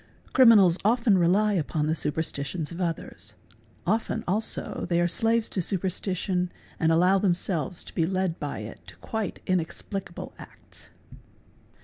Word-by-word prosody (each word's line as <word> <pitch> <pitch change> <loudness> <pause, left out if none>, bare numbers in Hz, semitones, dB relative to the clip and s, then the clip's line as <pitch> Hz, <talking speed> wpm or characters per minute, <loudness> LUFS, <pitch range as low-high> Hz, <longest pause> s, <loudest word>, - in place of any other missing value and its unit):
Criminals 205 -9 +7
often 230 0 +3
rely 200 +5 +3
upon 155 -3 0
the 155 - +1
superstitions 150 +1 -2
of 170 +2 -6
others; 170 -2 -4 0.5
often 220 +2 0
also 210 0 -2
they 170 -1 +2
are 175 - +3
slaves 225 +5 +1
to 190 - -1
superstition 185 0 -1 0.3
and 160 0 +3
allow 180 +4 +4
themselves 180 -3 0
to - - -12
be 165 -2 +1
led 185 -2 -1
by 145 -6 -4
it 105 - -8
to 90 - -11
quite 210 - -4
'inexplicable 185 +2 -3
acts. - - -13
180 Hz, 135 wpm, -26 LUFS, 165-200 Hz, 0.5 s, Criminals